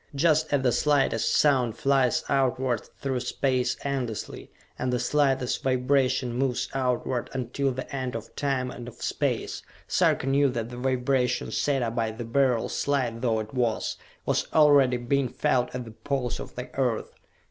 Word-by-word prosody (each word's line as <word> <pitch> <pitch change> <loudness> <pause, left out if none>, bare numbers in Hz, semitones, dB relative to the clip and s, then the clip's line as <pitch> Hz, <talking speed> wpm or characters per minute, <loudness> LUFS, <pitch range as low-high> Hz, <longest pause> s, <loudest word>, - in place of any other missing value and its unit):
Just 155 +1 +2
as 140 -2 +2
the 125 - +3
slightest 140 -5 +2
sound 130 -6 +3
flies 135 -4 +2
outward 130 -2 0
through 135 -2 -1
space 125 0 0
endlessly, 130 -6 -4 0.3
and 130 - -1
the 125 - +1
slightest 135 0 +1
vibration 130 -1 +1
moves 125 0 0
outward 125 -2 -1
until 135 +2 -1
the 130 +2 -6
end 130 -2 -3
of 115 -1 -7
time 135 -3 -1
and 120 0 -8
of 120 - -9
space, - - -2 0.3
Sarka - - +2
knew 140 +1 +3
that 120 -2 -3
the 120 - -7
vibration 130 0 0
set 140 -3 +1
up 115 -1 -2
by 115 -2 0
the 115 +2 -6
Beryl, 125 -1 +2
slight 125 -5 -1
though 115 -3 +1
it 110 0 -6
was, 120 -4 0 0.3
was - - 0
already 145 -5 +5
being 130 +2 0
felt 125 0 +1
at 125 -1 -4
the 115 - -9
Poles 125 +2 -3
of - - -8
the 125 - -7
Earth. 125 -5 -1
130 Hz, 165 wpm, -26 LUFS, 120-135 Hz, 0.3 s, already